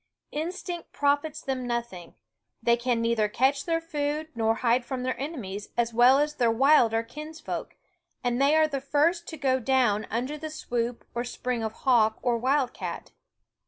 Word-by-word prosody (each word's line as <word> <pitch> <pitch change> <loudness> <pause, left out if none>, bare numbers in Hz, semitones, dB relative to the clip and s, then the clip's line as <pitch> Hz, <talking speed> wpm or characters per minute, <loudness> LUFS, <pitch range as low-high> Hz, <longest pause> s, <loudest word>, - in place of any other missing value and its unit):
Instinct 345 +2 -5
profits 290 +2 0
them 255 -2 -3
nothing; 235 -8 -4 0.5
they 235 +1 +4
can 240 -1 0
neither 230 -2 +1
catch 270 +5 +1
their 330 -1 +1
food 305 -1 -3
nor 225 -1 +1
hide 240 +1 +2
from 255 0 -4
their 255 0 -1
enemies 210 - -5
as 235 -1 +1
well 245 +3 +6
as 300 +1 +1
their 240 -5 +2
wilder 230 -2 +4
kinsfolk, 305 +7 -7 0.5
and 245 +1 0
they 285 +3 +4
are 315 0 +5
the 280 -3 -3
first 320 +5 +1
to 320 - -7
go 265 -2 +1
down 245 -4 +2
under 255 +6 -2
the 315 +1 -5
swoop 240 -5 -3
or 240 - -2
spring 245 -1 -3
of 220 -1 -3
hawk 225 -4 +4
or 245 -2 +2
wild 260 +1 +1
cat. - - -6
255 Hz, 170 wpm, -27 LUFS, 235-295 Hz, 0.5 s, well